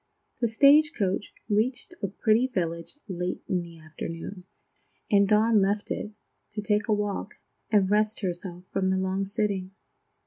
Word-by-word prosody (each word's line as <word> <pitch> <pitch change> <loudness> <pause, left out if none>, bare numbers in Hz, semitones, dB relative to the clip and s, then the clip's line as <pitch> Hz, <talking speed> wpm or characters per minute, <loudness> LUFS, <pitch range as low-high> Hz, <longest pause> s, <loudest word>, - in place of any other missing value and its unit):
The 235 - +2
stage 285 +7 +6
coach 195 -2 -1 0.2
reached 230 +9 +1
a 200 - 0
pretty 220 +5 +2
village 170 - -3
late 180 -2 -3
in 180 -2 0
the 170 -1 -11
afternoon, 165 +4 -7 0.7
and 200 -1 +5
Dawn 215 +1 +4
left 205 +2 0
it, 210 - -3 0.4
to 210 - -3
take 210 0 +1
a 215 - +3
walk 205 0 -2 0.3
and 205 -3 +4
rest 215 +2 +1
herself 180 -1 -4
from 190 -1 +1
the 190 0 +2
long 190 +1 -1
sitting. 195 -2 -2
200 Hz, 150 wpm, -27 LUFS, 185-215 Hz, 0.7 s, stage